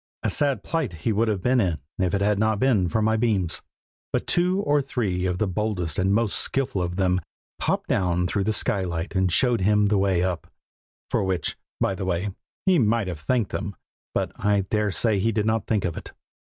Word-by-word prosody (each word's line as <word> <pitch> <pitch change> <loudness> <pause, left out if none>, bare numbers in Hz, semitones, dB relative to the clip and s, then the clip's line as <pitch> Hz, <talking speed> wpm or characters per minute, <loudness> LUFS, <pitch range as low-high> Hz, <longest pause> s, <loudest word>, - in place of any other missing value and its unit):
A - - +1
sad 140 -8 +1
plight 160 - -2
he 115 - +3
would 115 +3 +2
have 100 -4 -1
been 125 0 +3
in 90 -6 0 0.2
if 95 0 +1
it 100 - -1
had 105 0 +2
not 110 0 +2
been 105 -7 +2
for 110 +5 0
my 110 +1 +3
beams; 105 -7 0 0.5
but - - -1
two 180 +2 +2
or 145 -6 +2
three 100 -9 -1
of 90 -1 -1
the 110 - +1
boldest 90 -5 -2
and 95 +1 +2
most 110 0 +1
skilful 130 -8 0
of 90 0 -2
them 90 -1 +1 0.4
popped - - -1
down 90 -1 +1
through 95 +2 0
the 110 - +2
skylight 95 -7 -1
and 95 -2 +1
showed 120 +2 +3
him 105 +1 +3
the 105 -2 +2
way 95 -3 +2
up: 90 -3 -2 0.6
for - - +1
which, 95 -4 -1 0.2
by - - +1
the 95 0 -4
way, 95 +2 -1 0.3
he 185 -3 +4
might 115 -3 +2
have 85 -4 -4
thanked 115 +6 0
them, 100 -2 -4 0.4
but - - 0
I 105 -1 +3
dare 105 +2 0
say 100 +3 +2
he 115 +4 +1
did 105 -1 0
not 110 -1 0
think 105 -4 +1
of 85 -3 -2
it. - - -9
100 Hz, 215 wpm, -24 LUFS, 90-115 Hz, 0.6 s, he